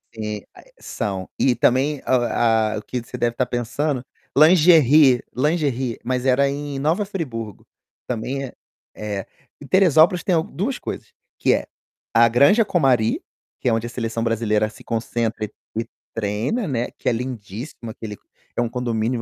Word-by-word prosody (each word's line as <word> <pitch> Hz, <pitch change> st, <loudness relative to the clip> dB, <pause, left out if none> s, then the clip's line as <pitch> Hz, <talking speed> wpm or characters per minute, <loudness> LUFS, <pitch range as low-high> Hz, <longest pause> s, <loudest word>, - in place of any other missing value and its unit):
Eh, 105 Hz, -2 st, -4 dB
a -, -, -15 dB
eh, -, -, -24 dB
são. 95 Hz, -5 st, -4 dB
E 125 Hz, -2 st, +3 dB
também, 135 Hz, +3 st, +2 dB
a 130 Hz, -, +3 dB
o 120 Hz, -, 0 dB, 0.6 s
ah, -, -, -9 dB
que 125 Hz, -, -3 dB
você 115 Hz, -, -8 dB
deve 120 Hz, -1 st, 0 dB
estar 125 Hz, +1 st, 0 dB
pensando 125 Hz, +3 st, -2 dB, 0.3 s
lingerie 155 Hz, -5 st, +6 dB
lingerie, 135 Hz, -4 st, 0 dB
mas 125 Hz, +1 st, -1 dB
era 135 Hz, +2 st, +4 dB
em 140 Hz, 0 st, -4 dB
Nova 165 Hz, +8 st, +1 dB
Friburgo, 125 Hz, -, -5 dB, 0.4 s
também 130 Hz, +3 st, -3 dB
é 125 Hz, -, -10 dB, 0.5 s
é. 105 Hz, -3 st, -4 dB, 0.4 s
Em 145 Hz, -, -10 dB
Teresópolis 175 Hz, -1 st, +4 dB
tem 190 Hz, -, +1 dB
al 160 Hz, -, +2 dB
2 245 Hz, +8 st, -3 dB
coisas, -, -, -7 dB, 0.3 s
que -, -, +3 dB
é -, -, -1 dB, 0.5 s
a 115 Hz, +1 st, +6 dB
Granja 140 Hz, -, +5 dB
Comari, 135 Hz, -, +2 dB, 0.4 s
que -, -, +1 dB
é 115 Hz, -, +2 dB
onde 115 Hz, +1 st, 0 dB
a -, -, -4 dB
seleção 115 Hz, -1 st, -3 dB
brasileira 110 Hz, -2 st, +1 dB
se 110 Hz, -, -15 dB
concentra 115 Hz, -1 st, -2 dB
e 105 Hz, -, -11 dB, 0.3 s
e 115 Hz, -, -3 dB, 0.3 s
treina, 115 Hz, -, -1 dB
né, 125 Hz, -4 st, -1 dB
que -, -, -7 dB
é -, -, +5 dB
lindíssimo, 115 Hz, 0 st, -6 dB
aquele 105 Hz, -2 st, -8 dB, 0.4 s
é -, -, +1 dB
um 120 Hz, -, +1 dB
condomínio 120 Hz, -1 st, -1 dB
125 Hz, 170 wpm, -22 LUFS, 115-145 Hz, 0.6 s, lingerie